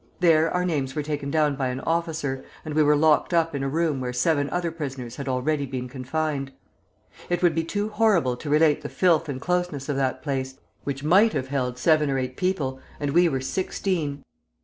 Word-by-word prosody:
There 165 -2 +4
our 180 0 0
names 140 -6 -1
were 150 - -1
taken 145 -1 -3
down 150 -1 +2
by 135 -1 -1
an 125 +1 -3
officer, 160 -5 -2 0.2
and 155 - -4
we 155 - +3
were 150 0 +5
locked 155 +3 +3
up 165 -1 +2
in 140 - -2
a 135 - -1
room 155 -1 0
where 125 -1 -2
seven 145 +3 +1
other 175 -1 -1
prisoners 135 -7 -6
had 140 - -5
already 140 +3 0
been 130 -1 -4
confined. 135 +2 -3 0.8
It 175 0 0
would 175 -2 +5
be 165 +1 0
too 205 +5 -2
horrible 210 - +2
to 150 - -7
relate 150 0 +4
the 145 - -6
filth 165 -4 +2
and 130 -2 -3
closeness 175 -4 -2
of 140 - 0
that 130 -1 -1
place, 130 -1 -2 0.3
which 135 -1 -3
might 195 +8 +5
have 130 0 -2
held 125 -3 -1
seven 155 +1 +3
or 135 - 0
eight 130 -1 -3
people, 145 -8 -1 0.2
and 145 -1 -1
we 175 +3 +5
were 135 -3 -2
sixteen! 155 -2 -2
150 Hz, 210 wpm, -25 LUFS, 135-165 Hz, 0.8 s, were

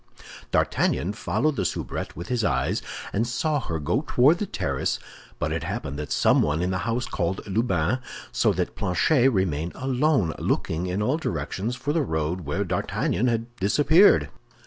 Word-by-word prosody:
D'Artagnan 95 +5 +1
followed 135 +8 0
the - - +1
soubrette 80 - -3
with 85 +3 -7
his 125 -3 0
eyes, - - 0 0.3
and 115 +4 +1
saw 145 +5 0
her 85 -10 -3
go 85 - 0
toward 145 +8 +4
the 210 - -2
terrace; 70 - -1 0.4
but - - -2
it - - -1
happened 70 +2 -4
that 75 -4 -5
someone 75 +5 +3
in 90 - 0
the 90 - -1
house 120 +2 0
called 90 +1 -2
Lubin, 100 0 0 0.3
so - - +2
that - - -2
Planchet 125 - +3
remained 85 - -1
alone, 130 - +1
looking 85 +3 -1
in 95 +3 -1
all 130 +8 +1
directions 95 - -3
for 145 +4 -2
the 165 - +2
road 80 - -2
where 95 +8 0
D'Artagnan 95 +5 -1
had 115 0 -2
disappeared. 150 - +5
100 Hz, 165 wpm, -25 LUFS, 85-130 Hz, 0.4 s, disappeared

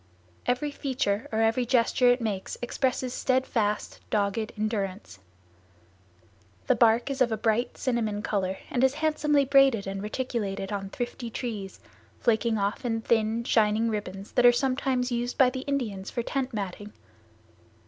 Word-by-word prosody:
Every 255 +4 0
feature 255 -7 -1
or 220 0 +1
every 225 +3 +2
gesture 245 +1 +3
it 245 +1 +3
makes 205 -4 -3
expresses 255 +1 -1
steadfast, 250 -6 0
dogged 210 +1 0
endurance. 200 - -3 1.5
The - - +4
bark 235 +3 +3
is 270 0 -4
of 240 -2 +4
a 220 - 0
bright 225 +3 0
cinnamon 220 -5 -1
color 190 -2 -1
and 245 - +1
is 265 +1 +3
handsomely 300 -2 +2
braided 270 -6 +4
and 195 0 -4
reticulated 210 -3 -3
on 195 -1 -3
thrifty 240 +2 -5
trees, 215 -5 -5 0.4
flaking 230 -1 +2
off 200 +4 -1
in 225 -2 -1
thin, 225 0 +1
shining 220 0 +2
ribbons 195 -2 -5
that 245 - +3
are - - +9
sometimes 255 0 0
used 240 +1 -2
by 255 -2 +5
the 260 - -4
Indians 220 -9 -2
for 240 - -3
tent 270 +1 -2
matting. 205 -1 -5
230 Hz, 150 wpm, -27 LUFS, 210-255 Hz, 1.5 s, are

